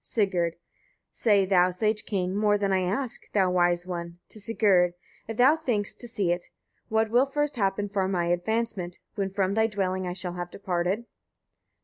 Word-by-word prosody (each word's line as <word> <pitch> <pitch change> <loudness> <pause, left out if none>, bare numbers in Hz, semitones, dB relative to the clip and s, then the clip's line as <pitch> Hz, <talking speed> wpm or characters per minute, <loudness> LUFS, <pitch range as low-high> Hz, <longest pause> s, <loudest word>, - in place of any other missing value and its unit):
Sigurd. 180 -6 0
8. - - -35 0.5
Say 205 -4 +3
thou, 185 -1 +4
sage 210 +4 -1
king! 185 -2 -1
more 205 0 +3
than 200 -1 0
I 190 - +3
ask, 220 +7 -2
thou 190 -3 +3
wise 175 -1 +2
one, 170 -1 -5
to 215 - -5
Sigurd, 195 -5 +3 0.3
if 225 0 -5
thou 265 +5 +6
thinkst 235 -10 -2
to 240 - -5
see 205 -7 0
it: 175 0 -2 0.4
what 220 0 +1
will 250 +4 +4
first 295 +1 -1
happen 205 -2 0
for 195 -2 0
my 180 -3 0
advancement, 180 -1 -1 0.2
when 195 -2 -2
from 195 0 0
thy 220 +1 +3
dwelling 190 -3 -2
I 180 - -2
shall 180 -1 -4
have 175 0 -5
departed? 185 +4 -2
195 Hz, 185 wpm, -27 LUFS, 180-220 Hz, 0.5 s, thou